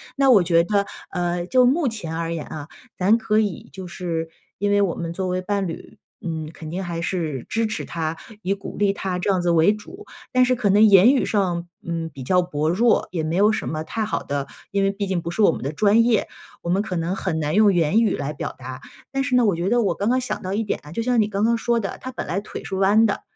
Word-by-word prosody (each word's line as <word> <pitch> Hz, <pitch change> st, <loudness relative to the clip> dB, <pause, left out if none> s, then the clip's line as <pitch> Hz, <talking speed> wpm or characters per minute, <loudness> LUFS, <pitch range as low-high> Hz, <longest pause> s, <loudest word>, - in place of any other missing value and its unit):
那 270 Hz, -1 st, +4 dB
我 205 Hz, -6 st, +7 dB
觉 170 Hz, -1 st, +3 dB
得， 200 Hz, +2 st, 0 dB, 0.2 s
呃， 175 Hz, -1 st, -1 dB
就 250 Hz, +5 st, +4 dB
目 290 Hz, +2 st, +2 dB
前 190 Hz, -8 st, -4 dB
而 165 Hz, 0 st, -2 dB
言 160 Hz, -2 st, -4 dB
啊， 150 Hz, -1 st, -7 dB, 0.3 s
咱 195 Hz, +4 st, +4 dB
可 215 Hz, -1 st, +1 dB
以 205 Hz, -6 st, -1 dB
就 190 Hz, -1 st, -8 dB
是 170 Hz, -3 st, -4 dB, 0.3 s
因 205 Hz, +1 st, 0 dB
为 205 Hz, 0 st, +4 dB
我 185 Hz, -4 st, +1 dB
们 170 Hz, -1 st, -4 dB
作 185 Hz, +1 st, -3 dB
为 180 Hz, 0 st, -1 dB
伴 200 Hz, 0 st, -1 dB
侣， 165 Hz, -, -9 dB, 0.2 s
嗯， 160 Hz, -3 st, -4 dB
肯 155 Hz, -1 st, -9 dB
定 185 Hz, +3 st, -3 dB
还 170 Hz, -2 st, -4 dB
是 160 Hz, -7 st, -3 dB
支 225 Hz, 0 st, 0 dB
持 215 Hz, -, -4 dB
他， 160 Hz, -1 st, -3 dB, 0.2 s
以 190 Hz, -, 0 dB
鼓 195 Hz, -, -9 dB
励 200 Hz, -1 st, +3 dB
他 190 Hz, -2 st, -3 dB
这 190 Hz, -, -1 dB
样 190 Hz, -, +2 dB
子 175 Hz, -1 st, +1 dB
为 165 Hz, +3 st, +5 dB
主。 360 Hz, -, -9 dB, 0.3 s
但 255 Hz, -1 st, +4 dB
是 255 Hz, 0 st, +2 dB
可 225 Hz, -4 st, 0 dB
能 205 Hz, +2 st, +5 dB
言 210 Hz, +3 st, +7 dB
语 270 Hz, -, +2 dB
上， 175 Hz, -4 st, 0 dB, 0.2 s
嗯， 165 Hz, -1 st, -3 dB
比 135 Hz, -2 st, -8 dB
较 180 Hz, +6 st, +3 dB
薄 155 Hz, -3 st, -1 dB
弱， 225 Hz, +7 st, +3 dB
也 170 Hz, -, -2 dB
没 160 Hz, +2 st, -2 dB
有 205 Hz, +3 st, +4 dB
什 215 Hz, -, -2 dB
么 155 Hz, 0 st, -3 dB
太 220 Hz, +7 st, -3 dB
好 220 Hz, -, -2 dB
的 140 Hz, -1 st, -3 dB, 0.2 s
因 200 Hz, 0 st, +1 dB
为 195 Hz, -, +2 dB
毕 200 Hz, 0 st, -3 dB
竟 185 Hz, -2 st, -1 dB
不 170 Hz, -, -5 dB
是 195 Hz, +6 st, -2 dB
我 -, -, +6 dB
们 -, -, -6 dB
的 140 Hz, -, -2 dB
专 215 Hz, +5 st, +4 dB
业， 230 Hz, -2 st, +2 dB, 0.3 s
我 170 Hz, -, -5 dB
们 190 Hz, +3 st, +2 dB
可 190 Hz, -4 st, -4 dB
能 170 Hz, +2 st, -1 dB
很 185 Hz, -4 st, -2 dB
难 150 Hz, 0 st, -1 dB
用 205 Hz, 0 st, +5 dB
言 175 Hz, +6 st, +3 dB
语 225 Hz, -, +2 dB
来 145 Hz, +1 st, -3 dB
表 145 Hz, -, -5 dB
达。 130 Hz, +1 st, -8 dB, 0.3 s
但 270 Hz, 0 st, 0 dB
是 265 Hz, -3 st, 0 dB
呢， 245 Hz, -, +4 dB
我 200 Hz, -5 st, +2 dB
觉 175 Hz, +3 st, -1 dB
得 240 Hz, +1 st, +3 dB
我 205 Hz, -, +1 dB
刚 200 Hz, +3 st, -1 dB
刚 255 Hz, +1 st, +3 dB
想 255 Hz, -, -4 dB
到 185 Hz, +1 st, -4 dB
一 215 Hz, +3 st, 0 dB
点 205 Hz, -, -2 dB
啊， 150 Hz, -, -12 dB
就 230 Hz, -, -2 dB
像 245 Hz, -1 st, +3 dB
你 210 Hz, -, +1 dB
刚 205 Hz, 0 st, -2 dB
刚 235 Hz, +1 st, +3 dB
说 235 Hz, 0 st, +1 dB
的， 195 Hz, -, -4 dB
他 260 Hz, -, -6 dB
本 -, -, -5 dB
来 175 Hz, +5 st, -1 dB
腿 -, -, -8 dB
是 195 Hz, -, -5 dB
弯 200 Hz, +4 st, +4 dB
的， 205 Hz, -, -1 dB
190 Hz, 290 characters per minute, -22 LUFS, 170-215 Hz, 0.3 s, 我